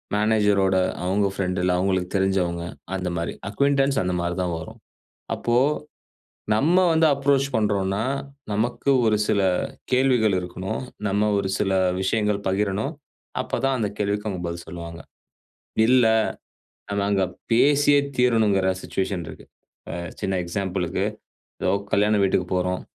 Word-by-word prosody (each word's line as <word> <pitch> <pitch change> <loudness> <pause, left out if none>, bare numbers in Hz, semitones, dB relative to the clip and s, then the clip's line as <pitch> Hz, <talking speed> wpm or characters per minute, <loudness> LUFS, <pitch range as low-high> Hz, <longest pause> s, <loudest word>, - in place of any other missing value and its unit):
மேனேஜரோட 105 -3 +3 0.3
அவுங்க 100 +2 +2
ஃப்ரெண்ட் 95 -1 -2
இல்ல 90 0 +2
அவுங்களுக்கு 95 -1 0
தெரிஞ்சவங்க 90 -3 0 0.3
அந்த 90 -1 -2
மாரி. 85 - -2 0.2
அக்கியூன்டன்ஸ் 140 +3 +2
அந்த 90 0 -1
மாரி 85 0 -2
தான் 90 -2 -2
வரும். 80 - -10 0.6
அப்போ, 120 0 0 1.0
நம்ம 150 +11 +3 0.2
வந்து 160 0 +4
அப்ரோச் 140 0 +2
பண்றோம்ன்னா, 100 -1 0 0.5
நமக்கு 120 +6 0 0.2
ஒரு 110 - +3
சில 100 - +2 0.5
கேள்விகள் 125 -6 +3
இருக்கணும். 90 +4 -5 0.3
நம்ம 105 +2 +1
ஒரு 100 - -1
சில 95 - 0 0.3
விஷயங்கள் 105 +1 0
பகிரணும். 100 +7 0 0.5
அப்ப - - -3
தான் 135 -1 +1
அந்த 105 -3 0
கேள்விக்கு 105 +1 -1
அவுங்க 95 -3 -4
பதில் 85 0 -5
சொல்வாங்க. 85 -1 -8 0.9
இல்ல, 125 0 +5 0.9
அ - - -1
நாங்க 100 -1 +1 0.3
பேசியே 145 +3 +4 0.2
தீரணும்ங்கற 110 -6 +3
சிச்சுவேஷன் 95 -3 -2
இருக்கு. - - -11 0.4
அ - - -5 0.3
சின்ன 95 -1 0
எக்ஸாம்பிள்க்கு, 95 0 -2 0.6
ஏதோ - - +2 0.2
கல்யாண 105 +1 +3
வீட்டுக்குப் 95 -1 +1
போறோம். 90 0 -1
100 Hz, 130 wpm, -24 LUFS, 95-115 Hz, 1.0 s, இல்ல